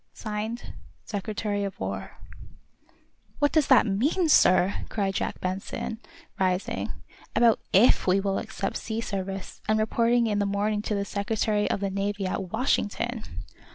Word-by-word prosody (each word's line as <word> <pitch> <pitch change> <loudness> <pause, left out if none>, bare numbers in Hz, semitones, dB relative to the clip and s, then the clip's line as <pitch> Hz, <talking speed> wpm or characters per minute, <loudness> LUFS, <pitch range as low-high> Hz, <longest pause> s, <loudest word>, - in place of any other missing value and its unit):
(Signed) 220 +2 -4 0.3
"Secretary 205 0 -2
of 195 -1 -5
War."_ - - -4 1.2
"What 290 -1 +2
does 310 -3 +3
that 265 -3 +6
mean, 270 - +1
sir," 185 -7 +4
cried 195 -3 -1
Jack - - -2
Benson, 190 +4 -4 0.4
rising, 180 - 0 0.4
"about 230 0 +5
if 200 +2 +5
we 185 +2 +4
will 195 0 0
accept 195 - -3
sea 220 0 -4
service, 195 -3 -5
and 215 - +4
reporting 235 +2 +2
in 210 -2 0
the 205 - +1
morning 205 +1 0
to 210 - -2
the 200 0 -1
Secretary 210 +1 0
of - - -1
the 195 -1 -1
Navy 200 +1 -2
at 185 0 -3
Washington?" 235 0 -1
205 Hz, 145 wpm, -27 LUFS, 195-225 Hz, 1.2 s, that